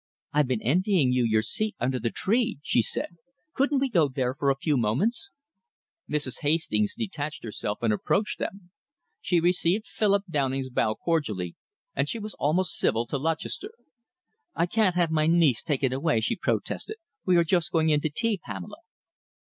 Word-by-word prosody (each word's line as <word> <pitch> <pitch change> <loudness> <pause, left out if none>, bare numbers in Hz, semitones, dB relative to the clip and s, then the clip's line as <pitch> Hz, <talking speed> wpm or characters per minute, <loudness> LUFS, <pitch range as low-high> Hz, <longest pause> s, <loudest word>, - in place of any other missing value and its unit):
"I've 150 -2 +3
been 125 -4 -1
envying 175 - +3
you 125 -1 +2
your 110 -1 +2
seat 215 - -1
under 125 +1 0
the 115 0 0
tree," 225 - 0
she 125 - +3
said. 170 - -3 0.4
"Couldn't 280 +1 +2
we 270 0 +2
go 170 - +3
there 130 -2 -1
for 140 0 0
a 135 - +3
few 150 +1 0
moments?" 140 - 0 0.8
Mrs. 145 -4 -1
Hastings 145 -9 +1
detached 160 -10 -4
herself 105 -1 -4
and 110 -2 +3
approached 205 - 0
them. 190 -3 -5 0.5
She 175 - +2
received 180 +4 +1
Philip 200 -2 +1
Downing's 135 -4 -1
bow 110 -3 +1
cordially, 110 - -1 0.4
and - - 0
she 235 - -2
was 215 -1 -6
almost 175 +6 0
civil 115 +1 +1
to 140 - -3
Lutchester. 165 - -3 0.8
"I 170 - +2
can't 190 -1 +2
have 175 -2 +2
my 155 -1 +2
niece 160 -8 +4
taken 135 -3 0
away," 135 -2 +1
she 110 - 0
protested. 435 - -2 0.3
"We 185 - +3
are 170 - +5
just 170 0 +1
going 160 -1 +2
in 150 -1 +3
to 155 - 0
tea, 215 +6 +1
Pamela." 95 -5 -7
155 Hz, 175 wpm, -27 LUFS, 130-185 Hz, 0.8 s, are